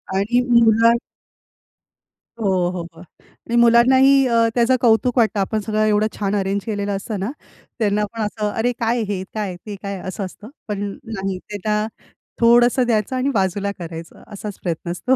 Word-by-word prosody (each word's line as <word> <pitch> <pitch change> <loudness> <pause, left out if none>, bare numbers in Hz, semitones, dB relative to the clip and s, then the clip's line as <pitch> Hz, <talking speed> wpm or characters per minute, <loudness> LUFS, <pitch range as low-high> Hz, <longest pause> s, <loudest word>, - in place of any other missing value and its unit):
आणि 220 +6 +2 0.2
मुला 230 +1 +5 1.5
हो, - - -1 0.3
हो, 180 -2 -4
हो. - - -15 0.2
आणि 235 - -8
मुलांनाही 260 +4 +5
अ, 230 -1 +3
त्याचं 240 +2 +3
कौतुक 245 +2 +3
वाटतं. 220 -3 +2
आपण 215 +3 0
सगळं 215 +1 0
एवढं 215 0 +2
छान 200 0 0
अरेंज 195 0 -1
केलेलं 205 -2 -2
असतं 200 +1 -4
ना? 205 +7 -2 0.5
त्यांना 210 -1 +1
पण 225 - -4
असं, 210 0 -2
"अरे 230 +4 0
काय, 235 +1 +1
हे 190 -2 -3
काय? 205 -4 -3
ते 210 -2 -6
काय?" 200 -2 -5
असं 190 +1 -4
असतं. 210 +4 -11 0.2
पण 205 -1 -3 0.2
नाही, 195 -4 -4
त्यांना 210 +1 -1 0.6
थोडंसं 240 +2 +5
द्यायचं 225 +1 0
आणि 255 +2 0
बाजूला 200 0 0
करायचं 165 -1 -9
असाच 205 0 -7
प्रयत्न 170 0 -3
असतो. 255 +8 +1
215 Hz, 160 wpm, -20 LUFS, 200-235 Hz, 1.5 s, मुला